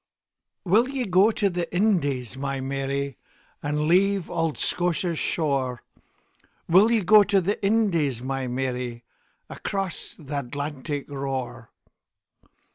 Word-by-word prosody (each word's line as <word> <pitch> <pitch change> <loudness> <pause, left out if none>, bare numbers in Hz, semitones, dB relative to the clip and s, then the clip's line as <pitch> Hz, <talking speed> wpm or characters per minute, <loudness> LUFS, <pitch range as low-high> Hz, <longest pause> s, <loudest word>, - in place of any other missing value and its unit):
WILL 220 +8 +3
ye 270 -2 -2
go 190 +2 +5
to 210 -2 +1
the 175 -2 -3
Indies, 145 - +1
my 135 0 -3
Mary, 135 0 -3 0.4
And 150 +1 -1
leave 195 +2 +2
auld 165 -2 -1
Scotia's 175 -1 0
shore? 135 -6 -1 0.8
Will 190 +6 +6
ye 225 -3 +2
go 210 +4 +7
to 200 0 +3
the 200 +4 -2
Indies, 185 - +2
my 135 +1 -3
Mary, 125 -1 -3 0.4
Across 195 -2 -4
th' 150 -3 -13
Atlantic 145 +1 -4
roar? 135 -4 -4
150 Hz, 120 wpm, -25 LUFS, 135-190 Hz, 0.8 s, go